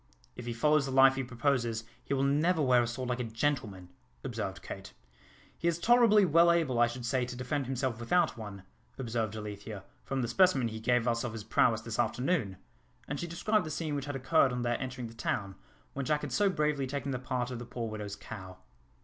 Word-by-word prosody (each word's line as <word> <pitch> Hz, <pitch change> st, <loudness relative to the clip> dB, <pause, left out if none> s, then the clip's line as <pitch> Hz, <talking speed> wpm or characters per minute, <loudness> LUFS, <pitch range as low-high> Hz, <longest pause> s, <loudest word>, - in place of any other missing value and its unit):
"If 120 Hz, -, -8 dB
he 120 Hz, -, -2 dB
follows 150 Hz, +4 st, +3 dB
the -, -, -3 dB
life 135 Hz, 0 st, +7 dB
he 135 Hz, 0 st, -2 dB
proposes, 120 Hz, -2 st, 0 dB, 0.2 s
he 140 Hz, -, -1 dB
will 135 Hz, -, +1 dB
never 155 Hz, +5 st, +2 dB
wear 130 Hz, -4 st, +4 dB
a 120 Hz, -, 0 dB
sword 125 Hz, +1 st, -4 dB
like 125 Hz, 0 st, -1 dB
a -, -, 0 dB
gentleman," 110 Hz, -6 st, -2 dB, 0.3 s
observed -, -, -4 dB
Kate. -, -, -8 dB, 0.6 s
"He 170 Hz, -, -2 dB
is 170 Hz, -1 st, +2 dB
tolerably 220 Hz, +1 st, +5 dB
well 170 Hz, +1 st, +5 dB
able, 155 Hz, -8 st, +1 dB
I 120 Hz, -, +6 dB
should 120 Hz, 0 st, -6 dB
say, 130 Hz, +1 st, +1 dB
to 125 Hz, 0 st, -5 dB
defend 125 Hz, +2 st, -2 dB
himself 130 Hz, -3 st, -2 dB
without 170 Hz, +8 st, +2 dB
one," 105 Hz, -4 st, -8 dB, 0.3 s
observed 115 Hz, -4 st, -2 dB
Alethea, 105 Hz, -1 st, -7 dB, 0.2 s
"from 135 Hz, -1 st, -2 dB
the -, -, -1 dB
specimen 135 Hz, -2 st, +3 dB
he 110 Hz, 0 st, -6 dB
gave 120 Hz, +1 st, +2 dB
us 115 Hz, -1 st, +1 dB
of 120 Hz, -2 st, -3 dB
his 110 Hz, -2 st, -6 dB
prowess 115 Hz, +1 st, +2 dB
this 115 Hz, -1 st, -5 dB
afternoon," 125 Hz, -, 0 dB, 0.5 s
and 145 Hz, -, -3 dB
she 175 Hz, -, -3 dB
described 205 Hz, +5 st, +1 dB
the 155 Hz, -, -6 dB
scene 155 Hz, 0 st, -3 dB
which 140 Hz, -1 st, -2 dB
had 145 Hz, -1 st, -4 dB
occurred 135 Hz, +1 st, +3 dB
on 125 Hz, 0 st, -2 dB
their 120 Hz, -1 st, 0 dB
entering 130 Hz, -1 st, -4 dB
the 115 Hz, -, -8 dB
town, 100 Hz, -3 st, -2 dB, 0.4 s
when 140 Hz, -, -3 dB
Jack 150 Hz, +3 st, +1 dB
had 150 Hz, -, -5 dB
so 200 Hz, +10 st, +3 dB
bravely 150 Hz, -6 st, 0 dB
taken 140 Hz, +1 st, -3 dB
the 130 Hz, -, -2 dB
part 125 Hz, -1 st, -2 dB
of 125 Hz, -, -5 dB
the 120 Hz, -, -7 dB
poor 120 Hz, -1 st, -4 dB
widow's 105 Hz, -2 st, -5 dB
cow. 95 Hz, -5 st, -9 dB
125 Hz, 220 wpm, -31 LUFS, 115-145 Hz, 0.6 s, life